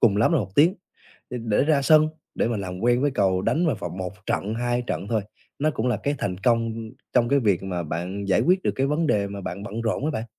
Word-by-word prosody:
cùng 105 -4 +4
lắm 115 +10 +3
là 165 - +4
1 95 -5 -4
tiếng 165 +6 +5 0.6
để 125 - -4
để 110 +2 +2
ra 150 -3 +3
sân, 155 +1 +5 0.3
để - - +1
mà 120 - -1
làm 90 -2 -5
quen 120 +2 +2
với 145 0 +2
cầu 95 -5 +1
đánh 165 - +1
vào 140 - +1
vào 90 - -5
1 90 +1 -5
trận, 105 +3 -1
2 120 +1 0
trận 100 - -3
thôi, 110 -3 +1 0.4
nó 155 - +2
cũng 125 -1 -2
là 120 -4 +1
cái 145 +1 0
thành 90 -2 -2
công 115 0 0 0.2
trong 120 -1 +3
cái 140 - +4
việc 100 -7 +1
mà 90 -3 -3
bạn 90 +6 -4
giải 95 - +3
quyết 185 +2 +2
được - - +1
cái 135 - +1
vấn 155 +2 0
đề 100 -5 +2
mà 100 0 -6
bạn 95 +2 -5
bận 110 +3 -5
rộn 115 +5 -1
á 155 - +1
bạn. 115 -6 -3
115 Hz, 265 wpm, -24 LUFS, 100-135 Hz, 0.6 s, tiếng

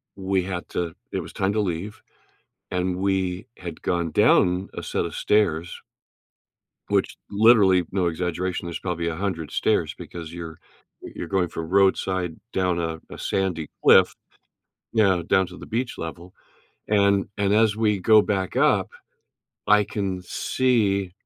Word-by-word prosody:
we 95 -1 0
had 90 -1 -5
to 85 -1 -3 0.2
it 95 - -2
was - - -10
time 95 0 0
to 110 - 0
leave, 100 +3 -4 0.7
and 90 0 -1
we 95 0 -1
had 85 -3 -8
gone 85 -2 -1
down 90 +1 +3
a - - -5
set - - -2
of 85 - -7
stairs 85 -6 0 1.1
Which, - - 0
literally 100 -4 +5
no 95 -2 +1
exaggeration, 90 +2 -2
there's 85 -1 -5
probably 85 -2 -3
100 85 -3 -3
stairs - - +1
because 85 -1 -8
you're 85 -2 -8 0.4
y - - -9
you're - - -5
going 95 -3 0
from 80 -1 -6
roadside 95 -3 +1
down 90 -2 +1
a 80 -1 -3
a - - -9
sandy 90 -5 -2
cliff, - - +6 0.8
you 110 - +3
know, 95 -4 +3
down 95 +2 +2
to 90 - -11
the - - -10
beach 120 +2 -3
level, 85 +2 -7 0.5
and 100 -1 +3
and 100 -1 +1
as 110 -1 +3
we 105 -3 +1
go 110 +3 +6
back 95 -3 -2
up, - - +3 0.8
I 105 0 +5
can 95 -3 -3
see 100 -3 0
95 Hz, 150 wpm, -24 LUFS, 85-100 Hz, 1.1 s, cliff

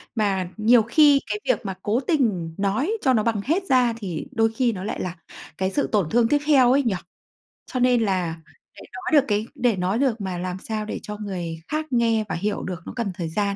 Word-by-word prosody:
Mà 195 -5 0
nhiều 225 +2 +5
khi 285 +4 +5
cái 420 - -2
việc - - 0
mà 195 - -2
cố 220 +4 +1
tình 215 - 0
nói 260 - 0
cho 260 -4 +3
nó 215 -3 +2
bằng 225 -3 0
hết 335 +7 +1
ra 250 -3 +4
thì 185 -8 -5
đôi 225 -3 +2
khi 245 -1 +2
nó 185 -3 -6
lại 210 - -4
là 180 -1 -4 0.4
cái 190 0 -1
sự 285 - 0
tổn 195 -7 +1
thương 235 0 +3
tiếp 290 +5 +3
theo 260 -5 +5
ấy 280 +1 +3
nhỉ? 220 -6 0 0.8
Cho 255 - -2
nên 245 -1 +3
là 180 -6 0 0.4
để - - -12
nói 315 -5 +3
được - - -11
cái 210 +1 0
để 240 -3 +2
nói 190 +5 -1
được 240 -6 +1
mà 185 -2 -3
làm 180 +1 -4
sao 215 0 -4
để - - -5
cho 210 0 -6
người 180 -6 -5
khác 310 +1 -2
nghe 230 -3 +2
và - - -2
hiểu 205 +5 -2
được 180 -2 -5
nó - - -7
cần 230 -5 -2
thời 170 -2 -4
gian. 200 +3 -1
220 Hz, 235 wpm, -23 LUFS, 190-250 Hz, 0.8 s, nhiều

